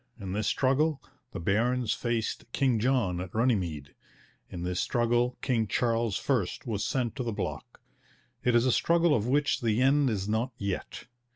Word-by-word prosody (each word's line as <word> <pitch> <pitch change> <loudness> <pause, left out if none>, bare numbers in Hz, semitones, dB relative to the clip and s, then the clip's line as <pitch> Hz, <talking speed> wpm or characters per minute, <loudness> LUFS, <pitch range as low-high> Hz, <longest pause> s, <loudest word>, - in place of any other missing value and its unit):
In 95 -3 -5
this 105 0 -1
struggle 140 +5 +2 0.3
the - - -6
barons 115 +6 +1
faced 115 -1 -3
King 130 -5 +2
John 110 -8 +1
at 90 +1 -8
Runnymede. 90 - 0 0.6
In 85 - -6
this 90 0 -1
struggle 120 +1 +1
King 115 -5 +1
Charles 115 0 0
I 125 -9 +3 0.2
was 105 -4 -2
sent 125 -2 -1
to 130 - -2
the 120 - -2
block. 105 - -5 0.6
It 125 -1 +2
is 120 +1 +4
a 130 - +3
struggle 170 +4 +3
of 110 -4 +1
which 145 +3 +1
the 115 -1 +1
end 135 +1 +4
is 100 -3 -2
not 115 +4 -1
yet. 100 -2 -4
120 Hz, 170 wpm, -28 LUFS, 105-130 Hz, 0.6 s, is